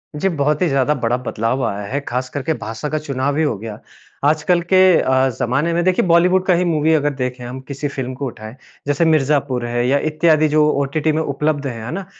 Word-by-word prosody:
जी, 170 +6 0
बहुत 150 -3 0
ही 180 - +3
ज़्यादा 135 +1 +2
बड़ा 120 -2 0
बदलाव 125 +1 -2
आया 100 0 -4
है 140 +7 -2
ख़ास 125 +1 -3
करके 145 +3 -2
भाषा 115 +5 -5
का 155 - -1
चुनाव 140 -1 -2
हीं 160 - +2
हो 130 -8 -1
गया। 105 0 -8 0.5
आजकल 155 +4 +2
के - - +6 0.2
अ, 130 0 +2
ज़माने 140 +8 0
में 170 +1 +1
देखिए 185 +1 +2
बॉलीवुड 180 +2 +3
का 185 - +3
ही 175 +1 +2
मूवी 160 -1 +2
अगर 145 -2 +1
देखें 125 -2 -4
हम 125 +2 -7
किसी 140 +1 -4
फ़िल्म 130 -2 -5
को 140 +2 -5
उठाएँ 110 -1 -9 0.3
जैसे 145 +3 +1
मिर्ज़ापुर 140 -5 +1
है 120 0 -1
या 140 +2 +3
इत्यादि 155 0 +3
जो 150 0 +3
ओटीटी 140 +3 0
में 155 +1 0
उपलब्ध 145 -1 -1
है, 115 -4 -6
है 125 - -5
ना? 190 +3 -5
140 Hz, 220 wpm, -19 LUFS, 125-155 Hz, 0.5 s, के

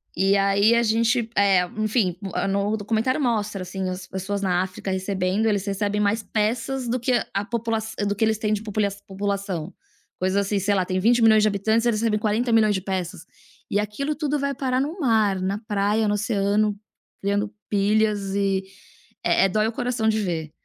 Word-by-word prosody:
E 195 +1 +3
aí 200 +3 +4
a 235 - +4
gente, 230 +1 +1
eh, 195 -3 +4
enfim, 215 -4 0 0.3
no 200 +2 0
documentário 225 +6 0
mostra, 215 -6 -1
assim, 185 +1 -4
as 185 +1 -6
pessoas 190 +2 -4
na 180 -2 +1
África 190 +1 -6
recebendo, 190 +2 -1
eles 205 -3 +1
recebem 205 +1 -1
mais 210 +2 +1
peças 230 +5 -1
do 250 +2 0
que 245 +2 0 0.2
a 200 +1 -1
popula 230 0 -1 0.3
do 205 - -1
que 220 - +2
eles 220 0 +1
têm 215 -1 -1
de 210 - -1
popule 210 -1 0 0.2
população. 195 -3 -3 0.5
Coisas 185 +1 0
assim, 205 - 0
sei 205 +2 +1
lá, 190 -2 +2
tem 185 +1 -2
20.000.000 225 0 +5
de - - +4
habitantes, 220 +3 +1
eles 225 -3 +1
recebem 220 -2 +1
40.000.000 220 0 +2
de 190 - -2
peças. 185 -2 -4 0.4
E 205 - +1
aquilo 245 +9 -2
tudo 295 -1 -1
vai 280 0 -1
parar 260 -1 0
no 310 +7 -4
mar, 220 - +2
na 190 +2 -2
praia, 210 0 0
no 205 - +1
oceano, 205 0 +1 0.5
criando 205 +2 -1 0.2
pilhas 205 -1 +1
e 195 -1 +1 0.6
eh - - +3
eh, - - +2
dói 215 +3 +1
o - - -1
coração 245 -1 -1
de 220 0 +1
ver. 165 -6 -3
210 Hz, 185 wpm, -23 LUFS, 195-225 Hz, 0.6 s, 20.000.000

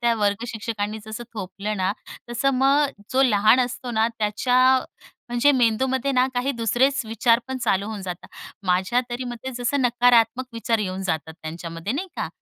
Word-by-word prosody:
त्या 235 -1 +2
वर्गशिक्षकांनी 215 0 -2
जसं 220 +2 -6
थोपलं 200 +1 -4
ना. 190 0 0 0.4
तसं 240 +3 +1
मग 275 -3 +2
जो 265 +1 +4
लहान 215 0 +5
असतो 245 0 -3
ना 220 -1 +2
त्याच्या, 250 +5 +3 0.5
म्हणजे 240 +4 +3
मेंदूमध्ये 260 +2 +1
ना 255 0 +3
काही 250 +3 0
दुसरेच 250 +4 +1
विचार 230 +1 +3
पण 265 0 -3
चालू 205 -4 0
होऊन 215 -3 -5
जातात. 180 -1 -7 0.4
माझ्या 190 +7 +2
तरी 245 +1 -3
मते 245 +1 -6
जसं 260 +4 0
नकारात्मक 245 0 +3
विचार 230 0 0
येऊन 190 -2 -3
जातात 160 -3 -3
त्यांच्यामध्ये 165 +4 -5
नाही 365 +8 -3
का? - - -2
230 Hz, 160 wpm, -23 LUFS, 205-255 Hz, 0.5 s, लहान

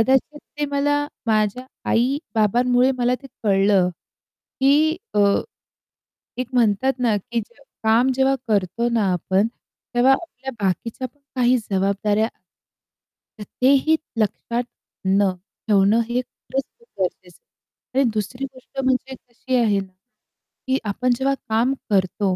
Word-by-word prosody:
कदाचित 265 +5 +2 0.2
ते 295 - +1
मला 285 +1 +2 0.3
माझ्या 215 +3 +1 0.3
आई-बाबांमुळे 245 - +2
मला 245 +1 +2
ते 275 - -9 0.2
कळलं 195 -2 +3 0.7
की 300 +4 +4 0.2
अ, - - +2 1.2
एक 250 -1 -3
म्हणतात 240 +2 +3
ना 235 -4 +2
की 235 +3 -3
जे 235 +6 -15 0.2
काम 230 +4 +4
जेव्हा 265 +1 +3
करतो 205 +2 +1
ना 230 -3 +1
आपण, 190 +4 +1 0.5
तेव्हा 250 +3 +5
आपल्या 265 -3 -3
बाकीच्या 230 +7 -1
पण 285 +4 -37 0.2
काही 250 0 +4
जबाबदाऱ्या 200 +3 +1 1.1
तर - - -5 0.2
तेही 275 +4 +5 0.2
लक्षात 235 +2 -1 0.4
...न 195 0 +3 0.4
ठेवणं 205 +2 +4
हे 245 +1 +1
खरंच 265 +2 -5 0.2
खूपच 470 - -24
गरजेचं 180 -1 -3
आहे. 265 - -8
आणि 250 - +3
दुसरी 220 +6 -3
गोष्ट 265 0 -11
म्हणजे 260 0 0 0.2
अशी 255 +2 -3
आहे 205 -3 +2
की 195 +6 -7
आपण 250 +5 +1
जेव्हा 275 +1 +1 0.2
काम 230 +4 +2 0.2
करतो, 190 0 +1
240 Hz, 125 wpm, -22 LUFS, 205-265 Hz, 1.2 s, तेव्हा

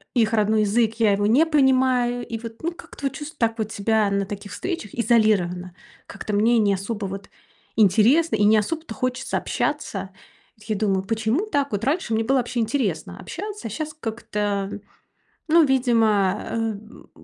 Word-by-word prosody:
их 225 -2 +2
родной 215 0 +3
язык- 220 +2 +2
я 210 -3 +4
его 205 +1 +1
не 275 +9 +5
понимаю. 255 -4 +2
И 230 - -4
вот, 230 -1 -9
ну, 340 - 0
как-то 285 - -10
вот 270 - -1
чувство 300 +1 -8
так 230 -1 +1
вот 215 0 -2
себя 215 0 +1
на 200 0 0
таких 200 0 -8
встречах 330 - -5
изолированно: 205 -7 +2 0.3
как-то 210 - -6
мне 225 +4 +3
не 205 -3 +3
особо 200 +2 -3
вот 195 +1 -7 0.5
интересно 225 - +4
и 210 - +1
не 215 +1 +5
особо-то 315 +6 -2
хочется 255 0 -2
общаться. 205 -11 -2 0.5
Вот 215 - -18
я 215 - +1
думаю: 195 -2 0
почему 225 - 0
так? 285 -9 0
Вот 205 0 -2
раньше 280 -5 0
мне 225 +1 +1
было 265 +3 +2
вообще 245 0 -1
интересно 220 - -1
общаться, 415 - -6
а - - -7
щас 310 +6 -4
как-то, 205 -4 -2 0.8
ну, 330 0 +6
видимо, 225 -7 +2
эм, 220 -1 -5
225 Hz, 170 wpm, -23 LUFS, 205-260 Hz, 0.8 s, ну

